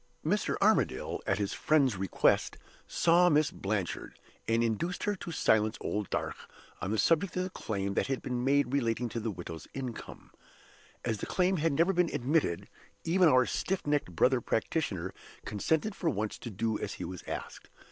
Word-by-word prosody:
Mr. - - +1
Armadale, - - +2
at - - +2
his 100 -2 -1
friend's 140 -7 +3
request, 95 0 +1 0.3
saw 175 +1 +4
Miss 150 -2 +3
Blanchard, 100 -3 -3 0.3
and 115 +1 +2
induced 120 - -1
her 205 0 0
to 175 - -7
silence 110 -7 +2
old 105 -2 -3
Darch - - -2 0.5
on 95 - -2
the 110 - 0
subject 165 - +2
of 180 - +1
the 185 - -3
claim 100 - -3
that - - 0
had 135 -1 -2
been 125 -1 -2
made 140 -1 +2
relating 120 -3 0
to 115 - -3
the 115 0 -2
widow's 85 -4 -7
income. 130 -4 -7 0.7
As 110 -3 -1
the - - -4
claim 185 +1 +2
had 160 -1 +1
never 170 +7 +3
been 175 -2 +2
admitted, 130 - 0 0.4
even 175 +1 +4
our 130 -2 +5
stiff 190 +8 -2
necked 145 - 0
brother 125 +8 +3
practitioner 110 - -1 0.3
consented 160 - 0
for 175 -4 -1
once 110 -5 -2
to 120 - -6
do 110 +1 -1
as - - -4
he - - -6
was 90 -1 -6
asked. - - -6
125 Hz, 175 wpm, -30 LUFS, 105-165 Hz, 0.7 s, our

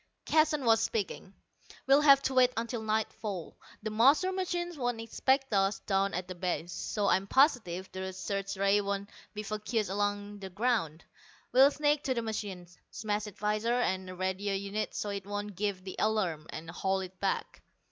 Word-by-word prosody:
Keston 310 -3 +3
was 225 -1 +5
speaking. 200 -3 -3 0.5
"We'll 275 +2 +6
have 275 -2 +7
to 265 - 0
wait 255 -1 +5
until 230 0 -2
nightfall. 215 -4 -3 0.3
The 215 - -3
master 275 - +4
machine 350 -2 -2
won't 245 -4 -2
expect 265 +3 0
us 195 0 +2
down 195 0 0
at 180 0 -3
the 185 - -5
base, 180 -1 -3
so 205 -2 -2
I'm 195 0 +2
positive 215 - +3
the 190 0 -4
search 195 +1 -4
rays 200 +1 +3
won't 200 0 -3 0.2
be 210 - -4
focussed 215 -1 -2
along 205 0 -2
the 190 -1 -7
ground. 195 -6 0 0.5
We'll 265 +2 +7
sneak 295 0 +1
to 260 - +1
the 235 - -1
machine, 205 -5 -4 0.2
smash 215 -1 -2
its 205 - -11
visor 215 +3 0
and 185 -6 -1
radio 190 +2 -1
units, 200 +2 -3
so 210 - -2
it 200 -1 -5
won't 205 0 -4
give 200 -1 -2
the 185 - -7
alarm, 185 -8 0
and 160 +1 -7
haul 190 +2 0
it 185 0 -9
back. 195 - -2
205 Hz, 175 wpm, -31 LUFS, 190-235 Hz, 0.5 s, have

